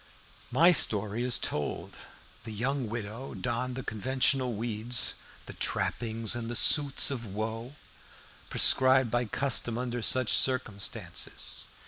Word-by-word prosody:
My 160 +8 +5
story 105 - +2
is 125 -1 +1
told. 75 - -4 0.5
The 115 - -8
young 125 +3 -3
widow 115 +3 -7
donned 125 +1 -3
the 130 - -6
conventional 130 +3 0
weeds 115 +2 +1 0.3
"the - - -10
trappings 115 -1 -1
and 120 -1 -5
the 120 - -5
suits 140 +2 +5
of 125 -4 -4
woe" 110 +5 -6 0.7
prescribed 130 -2 +4
by 120 +1 0
custom 120 -1 -1
under 120 -1 -4
such 130 +1 +3
circumstances. 115 -6 -2
120 Hz, 120 wpm, -28 LUFS, 110-130 Hz, 0.7 s, My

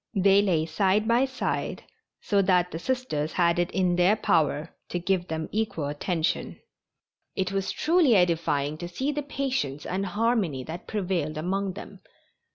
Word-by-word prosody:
They 195 +1 +5
lay 170 -6 +1
side 195 +6 +1
by 240 +3 +4
side, 260 -1 -3 0.4
so 200 -2 +2
that 180 -2 +2
the 165 - -5
Sisters 210 - -2
had 170 -1 +2
it 175 0 +1
in 180 -2 +1
their 180 +4 +4
power 155 -7 +1 0.2
to - - -2
give 180 0 0
them 160 0 -3
equal 210 -8 -1
attention. 160 +4 -2 0.8
It 190 0 -1
was 195 0 -1
truly 320 -7 +3
edifying 160 -5 +1
to 175 - -5
see 260 +12 -2
the 295 0 -2
patience 265 - -3
and 195 +2 -2
harmony 205 - 0
that 165 +6 -8
prevailed 175 -7 -2
among 190 +4 -1
them. 200 - -10
185 Hz, 160 wpm, -26 LUFS, 165-210 Hz, 0.8 s, They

